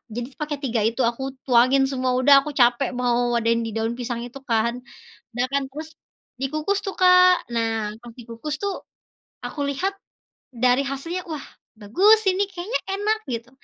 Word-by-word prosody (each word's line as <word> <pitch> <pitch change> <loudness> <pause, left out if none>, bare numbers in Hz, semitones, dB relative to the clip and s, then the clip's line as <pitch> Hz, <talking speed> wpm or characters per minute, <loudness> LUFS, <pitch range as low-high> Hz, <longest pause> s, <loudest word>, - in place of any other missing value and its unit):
Jadi 245 0 -3
s - - -24
pakai 300 -1 -2
3 235 -3 0
itu 230 +3 -2
aku 235 +3 -8 0.2
tuangin 255 +2 +4
semua, 255 -1 -1
udah 280 +2 +6
aku 300 - -6
capek 240 +2 +4
mau 245 -1 +1
wadahin 230 0 +1
di - - -3
daun 225 +1 -1
pisang 240 -1 -3
itu 245 +3 -10
kan. 230 +1 +2 0.6
Udah 245 +1 +1
kan 280 -1 +1
terus, 310 +3 -7 0.5
dikukus 310 +8 -1
tuh, 390 - -3
Kak. 365 0 +6
Nah, 225 -2 -1
pas 240 -1 -11
dikukus 240 +6 -6
tuh, 400 -1 0 0.7
aku 295 - -7
lihat 370 +8 -1 0.7
dari 250 +1 +4
hasilnya, 330 +7 -4
wah 305 -3 -5 0.4
bagus 385 - +5
ini 370 +2 -1
kayaknya 375 +6 -3 0.2
enak 425 +2 0 0.2
gitu. 230 +1 -5
260 Hz, 165 wpm, -23 LUFS, 235-315 Hz, 0.7 s, udah